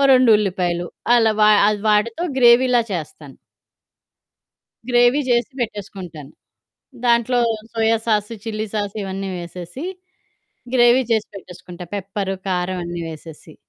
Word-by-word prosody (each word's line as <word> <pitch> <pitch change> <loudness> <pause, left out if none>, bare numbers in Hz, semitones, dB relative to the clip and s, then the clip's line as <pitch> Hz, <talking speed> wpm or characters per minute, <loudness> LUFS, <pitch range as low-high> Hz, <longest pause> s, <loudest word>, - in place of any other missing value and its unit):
2 255 -2 +5
ఉల్లిపాయలు. 180 -3 -1 0.3
అలా 225 -2 +4
వా 210 - +6 0.2
అది 210 -1 -1
వాటితో 225 +9 +1
గ్రేవిలా 245 0 +5
చేస్తాను. 150 -5 -7 1.5
గ్రేవీ 245 +3 +4
జేసి 240 +3 +1
పెట్టేసుకుంటాను. 190 - -6 0.7
దాంట్లో 240 +1 +2 0.3
సోయ 225 0 +1
సాసు, 215 0 0
చిల్లి 215 0 -3
సాసు 205 0 -3
ఇవన్నీ 195 0 -5
వేసేసి. 175 - -8 0.9
గ్రేవీ 245 +1 +5
చేసి 220 -2 +1
పెట్టేసుకుంటా. 180 -2 -10
పెప్పర్, 195 0 -3 0.2
కారం 180 0 -1
అన్నీ 175 0 -5
వేసేసి. 160 0 -12
210 Hz, 110 wpm, -20 LUFS, 180-235 Hz, 1.5 s, వా